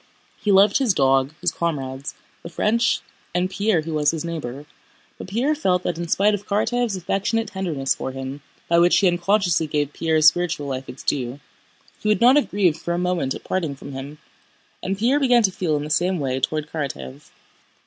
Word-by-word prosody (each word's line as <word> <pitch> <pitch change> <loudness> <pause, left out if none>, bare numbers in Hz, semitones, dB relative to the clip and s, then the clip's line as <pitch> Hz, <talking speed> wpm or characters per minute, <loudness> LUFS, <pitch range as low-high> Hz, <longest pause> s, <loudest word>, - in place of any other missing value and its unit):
He 210 - +1
loved 200 +3 +5
his 240 -9 +2
dog, 135 +1 +2
his 175 -2 +1
comrades, 140 -5 -3 0.3
the 170 - -8
French, 220 +7 +1 0.3
and 180 +1 0
Pierre 200 -4 +1
who 160 +1 -6
was 150 -1 +2
his 165 -1 -3
neighbor, 145 -4 -5 0.5
but - - -7
Pierre 240 +10 +1
felt 185 - 0
that 170 -1 -2
in 170 - -3
spite 205 +5 +3
of 205 0 -4
Karatáev's 225 +2 0
affectionate 200 +5 -1
tenderness 170 -9 -1
for - - -5
him 135 +2 -6 0.3
(by 170 0 +4
which 175 +1 +5
he 195 - +4
unconsciously 175 -2 +1
gave 145 -1 -1
Pierre's 160 -2 +5
spiritual 175 -4 -3
life 135 -1 -5
its 130 - -9
due) 130 0 -2 0.6
he - - -4
would 215 - +3
not 245 +3 +6
have 295 - +2
grieved 185 -6 +1
for 170 - -2
a - - -2
moment 175 -7 -1
at - - -9
parting 165 -7 -2
from 140 +1 -10
him. 135 +3 -7 0.6
And 195 +1 -2
Pierre 245 +7 +2
began 245 -4 +4
to 195 - +3
feel 170 -4 -1
in 145 - -3
the 150 - -6
same 180 +4 +1
way 130 -4 -1
toward 155 +3 -2
Karatáev. 130 - -6
170 Hz, 200 wpm, -22 LUFS, 145-200 Hz, 0.6 s, not